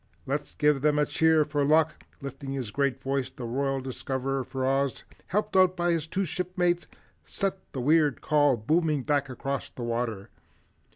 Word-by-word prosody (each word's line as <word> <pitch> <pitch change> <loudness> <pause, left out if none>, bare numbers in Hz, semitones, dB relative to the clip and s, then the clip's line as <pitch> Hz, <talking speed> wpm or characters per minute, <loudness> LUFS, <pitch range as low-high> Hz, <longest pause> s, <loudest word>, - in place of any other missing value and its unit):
Let's 145 +2 -3
give 150 -2 +3
them 150 0 +3
a 150 - +3
cheer 160 0 +3
for 145 -1 0
luck." 155 +1 +2 0.2
Lifting 135 0 -6
his 130 -6 -4
great 140 -1 0
voice, 135 -1 -1
the 125 -1 -8
Royal 135 +3 -1
Discoverer 130 +1 -3
for 130 +1 -3
Oz, 135 0 0 0.2
helped 210 +2 -1
out 185 0 +5
by 175 0 +2
his 165 -2 -1
two 190 +4 -1
shipmates, 175 0 -1 0.4
sent 195 -1 -1 0.2
the 130 - -4
weird 150 0 +3
call 145 -4 +3
booming 150 +4 +1
back 145 -2 +1
across 135 +2 -4
the 120 - -8
water. 115 -4 -3
140 Hz, 170 wpm, -27 LUFS, 130-160 Hz, 0.4 s, out